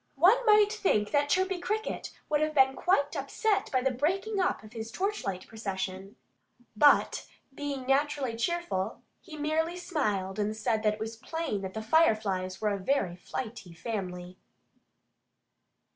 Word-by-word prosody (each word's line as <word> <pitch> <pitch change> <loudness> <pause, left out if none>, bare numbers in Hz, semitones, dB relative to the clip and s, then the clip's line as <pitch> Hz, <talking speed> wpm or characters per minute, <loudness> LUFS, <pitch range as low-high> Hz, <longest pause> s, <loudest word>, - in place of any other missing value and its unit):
One 400 - +5
might 420 0 +6
think 215 - +1
that 290 0 +2
Chirpy 375 +2 +1
Cricket 430 +5 -3 0.2
would 300 0 +1
have 310 0 0
been 265 -1 +5
quite 290 -5 +1
upset 395 - 0
by 255 - +2
the 265 +1 +1
breaking 380 - 0
up 365 - 0
of 215 +1 -13
his 225 -1 -6
torchlight 245 - -2
procession. 195 -2 -5 0.6
But 290 +7 +4 0.3
being 280 -2 -4
naturally 275 -2 +1
cheerful, 235 - -2 0.2
he 320 -4 -10
merely 320 +3 0
smiled 215 - -1
and 210 +1 -1
said 220 0 0
that 215 -1 +2
it - - -17
was 225 +1 -5
plain 260 -4 -3
that 190 0 -6
the 220 - -3
Fireflies 215 - +2
were 210 -1 +1
a 200 - -3
very 190 -4 0
flighty 205 0 -6
family. 180 -3 -5
265 Hz, 150 wpm, -29 LUFS, 210-330 Hz, 0.6 s, might